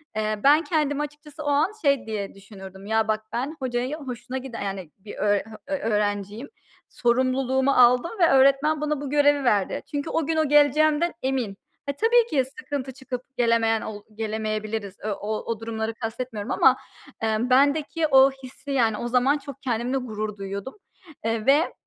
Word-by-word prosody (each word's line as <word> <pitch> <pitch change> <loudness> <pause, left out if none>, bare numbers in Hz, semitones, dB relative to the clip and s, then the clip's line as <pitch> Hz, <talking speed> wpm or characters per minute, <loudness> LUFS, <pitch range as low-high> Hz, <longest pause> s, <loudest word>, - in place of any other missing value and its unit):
Eee, 215 0 -1
ben 295 +3 +6
kendimi 295 -3 0
açıkçası 295 0 -8
o - - -6
an 295 +6 +2
şey 280 -2 +2
diye 210 -3 -4
düşünürdüm 195 -1 -12
"Ya, 220 +1 +1
bak, 215 0 0
ben 270 +6 -2
hocaya 255 +3 -2
hoşuna 255 -2 -6
giden, 255 -3 -7
e - - -2
yani 190 -5 -5
bir 205 +2 -10
öğr 205 -1 +2
ha 220 -1 -11
ö 290 - -1
öğrenciyim. 210 +2 -2 0.4
Sorumluluğumu 260 +2 +1
aldım 250 +5 +5
ve 340 - +5
öğretmen 275 +3 +4
bana 300 -1 -1
bu 285 - -4
görevi 290 -1 +3
verdi. 210 -6 +1
Çünkü 290 +1 -3
o 325 - 0
gün 325 - -1
o 315 - +2
geleceğimden 300 +3 +4
emin." 255 -7 -2 0.3
Ha, 280 - -2
tabii, 470 +1 +5
ki 270 -4 +2
sıkıntı 275 -6 -4
çıkıp 260 -2 -6 0.2
gelemeyen 230 -2 +2
ol 205 -1 -6
gelemeyebiliriz, 215 -2 -3
e - - -3
o 210 +1 -3
o 230 -2 -3
durumları 225 0 -3
kastetmiyorum 225 0 -5
ama, 265 -1 +5 0.4
emm, 220 +2 0
bendeki 285 +4 +3
o 270 -1 +6
hissi 265 +1 -10
yani 230 -5 +2
o 240 - -3
zaman 255 +4 +3
çok 280 -2 -10
kendimle 245 +1 -1
gurur 215 -4 -4
duyuyordum, 200 +5 -6 0.5
eee, 225 -1 -1
ve, 290 +5 +4
255 Hz, 175 wpm, -24 LUFS, 220-285 Hz, 0.5 s, ben